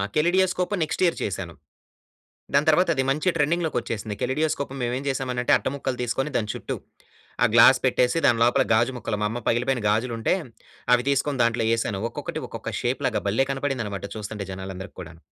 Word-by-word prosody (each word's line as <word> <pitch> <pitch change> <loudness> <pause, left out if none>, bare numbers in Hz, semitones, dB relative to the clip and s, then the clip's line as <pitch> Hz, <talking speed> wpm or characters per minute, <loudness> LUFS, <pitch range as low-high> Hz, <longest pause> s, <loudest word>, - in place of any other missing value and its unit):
Kaleidoscope 180 +4 +2
next 155 - -2
year 170 - +2
చేశాను. 95 -4 -4 1.0
దాని 145 +3 +3
తర్వాత 175 +3 +4
అది 130 - +1
మంచి 155 +6 +1
ట్రెండింగ్‌ 165 +3 +1
లోకి 160 - -2
వచ్చేసింది. 110 -3 -5
కెలిడియోస్కోప్ 140 +1 -1
మేవేం 125 +3 -2
చేసామనంటే 125 -2 -1
అట్టముక్కలు 130 -1 -3
తీసుకొని 135 +4 -1
దాని 105 -2 -1
చుట్టూ, - - -4 0.7
ఆ - - +7
గ్లాస్ 130 +3 +7
పెట్టేసి 125 +2 +2
దాని 115 -2 +3
లోపల 120 - +4
గాజు 120 +3 +3
ముక్కలు, 115 -3 -3
మా 105 - +2
అమ్మ 115 +3 -4
పగిలిపోయిన 125 0 0
గాజులుంటే, 115 - +1 0.6
అవి 125 +2 -2
తీసుకొని 140 -1 +1
దాంట్లో 115 -1 +1
యేసాను. 115 -3 0
ఒక్కొక్కటి - - -5
ఒక్కొక్క - - -6
షేప్‌లాగా - - 0
బల్లె 115 +7 +2
కనపడిందన్నమాట 125 -8 -3
చూస్తుంటే 105 -1 -5
జనాలందరికి 95 0 -7
కూడాను. 80 -1 -12
125 Hz, 160 wpm, -24 LUFS, 110-140 Hz, 1.0 s, ఆ